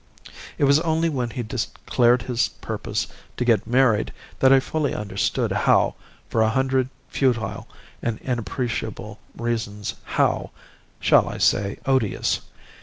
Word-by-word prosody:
"It - - 0
was 140 +1 +6
only 165 0 +1
when 125 -6 -2
he 120 +2 -4
declared 120 +1 +1
his 120 -1 +1
purpose - - -4 0.3
to 125 - 0
get 115 -3 +3
married 120 -3 +3 0.3
that 130 - +5
I 135 - +7
fully 145 +2 -1
understood 100 -2 -1
how, - - +3 0.3
for 110 - 0
a 110 - +4
hundred 130 +1 +1 0.2
futile 125 -5 0 0.3
and 115 -2 -1
inappreciable 110 -3 -3 0.2
reasons, 110 -4 -2 0.2
how - - +2 0.5
shall - - +4
I - - -5
say 100 0 +2
odious? 130 -7 +1
120 Hz, 130 wpm, -23 LUFS, 110-135 Hz, 0.5 s, I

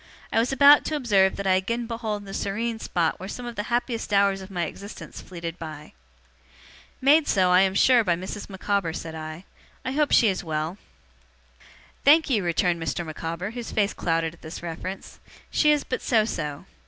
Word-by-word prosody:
I - - +4
was 235 +3 +1
about 280 +2 +7
to 310 - -1
observe 200 -9 +3
that 200 - -5
I 190 - +4
again 230 +6 0
behold 225 -3 -4
the 195 - -8
serene 225 +4 -2
spot 170 -6 -1
where 190 +2 -7
some 245 - -6
of 240 -1 -6
the - - -1
happiest 240 -2 -1
hours 200 -1 +3
of 190 - -10
my 175 -3 -2
existence 200 +6 -9
fleeted 170 -1 -7
by.' 155 -2 -8 1.1
'Made 290 +4 +5
so, 185 -3 +3
I 180 +1 +6
am 190 0 +2
sure, 245 +2 +5
by 175 -4 +2
Mrs. 190 +4 -7
Micawber,' 195 -3 -1
said 160 0 -6
I. 155 +3 -7 0.4
'I 255 - -1
hope 295 +2 +1
she 230 - +6
is 195 -1 -1
well?' 160 +3 -3 1.2
'Thank 300 +1 +5
you,' 215 -6 +2
returned 170 0 +1
Mr. 165 +1 -2
Micawber, 165 +4 -5
whose 240 -1 -6
face 205 -1 +1
clouded 165 -1 -1
at 170 - -19
this 160 +1 -8
reference, 175 +3 -7 0.3
'she 300 - +4
is 295 -1 +2
but 255 - -3
so 220 -3 +2
so. 150 -6 -4
195 Hz, 190 wpm, -25 LUFS, 170-230 Hz, 1.2 s, about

